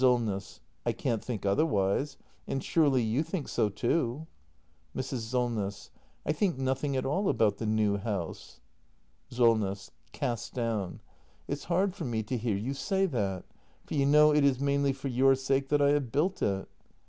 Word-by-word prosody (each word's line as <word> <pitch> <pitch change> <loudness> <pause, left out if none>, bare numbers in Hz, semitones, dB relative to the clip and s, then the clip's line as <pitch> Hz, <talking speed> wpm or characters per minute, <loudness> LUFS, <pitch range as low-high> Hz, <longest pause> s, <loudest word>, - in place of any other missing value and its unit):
Solness. 115 -6 +1 0.2
I - - 0
can't 115 -5 -2
think 115 -5 -4
otherwise. 100 +3 +1 0.3
And 135 - -2
surely 140 -7 +3
you 115 +6 +1
think 165 -1 -4
so 105 - +1
too? 120 +6 -1 0.7
Mrs. 130 -1 -3
Solness. 110 -4 -2 0.3
I - - +1
think 170 0 0
nothing 135 +1 -1
at 130 - -1
all 190 +9 +1
about 105 -3 +2
the 110 - -3
new 105 -2 +2
house. 100 -5 -5 0.7
Solness. 110 -5 +1 0.2
[Cast 120 - -3
down.] 115 -6 -2 0.5
It's 145 +1 -4
hard 185 +2 +1
for 200 - -6
me 115 -3 -1
to 115 +5 -3
hear 115 -4 -1
you 120 +7 -3
say 195 +7 0
that; 100 - -2 0.4
for - - -7
you 140 -2 +2
know 150 +1 +6
it 150 -1 +4
is 135 -3 +3
mainly 140 0 +2
for 135 +1 -5
your 135 +1 +4
sake 135 +1 0
that 145 -1 +3
I 140 - +5
have 145 -5 0
built 180 - 0
it. 95 -1 0
130 Hz, 170 wpm, -29 LUFS, 110-145 Hz, 0.7 s, know